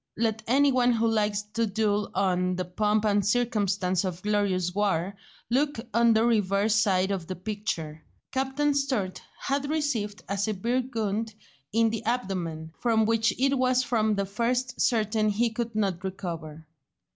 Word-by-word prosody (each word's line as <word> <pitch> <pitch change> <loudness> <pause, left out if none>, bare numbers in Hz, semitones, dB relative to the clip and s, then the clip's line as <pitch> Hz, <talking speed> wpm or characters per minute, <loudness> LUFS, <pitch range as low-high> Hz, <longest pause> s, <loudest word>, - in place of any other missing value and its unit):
Let 220 -1 0
any 275 +4 +4
one 250 -1 +3
who 230 0 +1
likes 210 -2 +1
to 230 0 +1
dwell 210 0 0
on 180 -1 +1
"the 185 0 -2
pomp 210 +4 0
and 205 -1 +2
circumstance 200 -4 +1
of 185 -1 -4
glorious 200 -4 0
war" 195 -2 0 0.4
look 285 +1 +1
on 235 +1 +5
the 220 +1 +3
reverse 205 -2 +2
side 195 -3 +2
of 185 -4 -3
the 185 - -4
picture. 180 -6 -4 0.3
Captain 270 +2 0
Sturt 260 -10 -1 0.2
had 280 +1 -1
received 255 -10 -2
a 200 0 -2
severe 220 +5 0
wound 220 0 -2 0.4
in 225 +1 +3
the 225 - -4
abdomen, 180 -9 -3
from 225 -2 +2
which 225 +1 +2
it 275 +1 +3
was 255 0 +3
from 220 -3 +1
the 200 0 -1
first 245 +5 -1
certain 215 -2 +2
he 225 +3 +1
could 230 -1 -4
not 195 -4 -1
recover. 165 -5 -6
215 Hz, 155 wpm, -27 LUFS, 195-235 Hz, 0.4 s, on